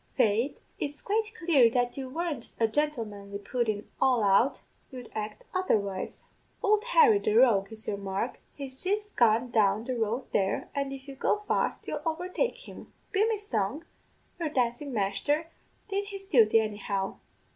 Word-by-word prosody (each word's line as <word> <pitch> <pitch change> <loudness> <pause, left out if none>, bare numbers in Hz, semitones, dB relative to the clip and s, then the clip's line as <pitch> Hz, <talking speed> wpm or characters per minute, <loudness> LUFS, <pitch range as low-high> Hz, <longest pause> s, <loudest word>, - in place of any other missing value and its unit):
Faith, 225 +6 +2 0.2
it's 290 0 -3
quite 425 +1 -1
clear 305 - +5
that 245 +1 +1
if - - -22
you 260 -1 -5
weren't 310 -4 -4
a 225 - +4
gentlemanly 220 -7 -2
pudden 215 0 -2
all 255 -4 +4
out, 205 +7 +3 0.3
you'd 250 -3 -9
act 210 -1 -5
otherwise. 205 - -1 0.4
Ould 425 +1 +3
Harry, 465 -4 +6
the 215 - 0
rogue, 225 -5 +5
is 220 0 -5
your 200 - -1
mark; 200 +4 -3 0.2
he's 265 -2 -6
jist 415 +2 -1
gone 235 +1 +3
down 215 -1 +3
the 255 +1 -3
road 230 +3 -1
there, 195 -1 0
and 280 -1 -2
if 270 0 -8
you 275 - -7
go 420 +10 0
fast - - 0
you'll - - -3
overtake 360 +8 -2
him. - - -11 0.2
Be 415 +3 +3
me 445 - +1
song, 285 - -2 0.5
your 330 -3 -1
dancin' 255 +1 -1
masther 275 +10 0 0.4
did 400 0 -1
his 395 -1 -7
duty, 230 - +5
anyhow. 205 -2 -2
255 Hz, 165 wpm, -29 LUFS, 215-330 Hz, 0.5 s, Harry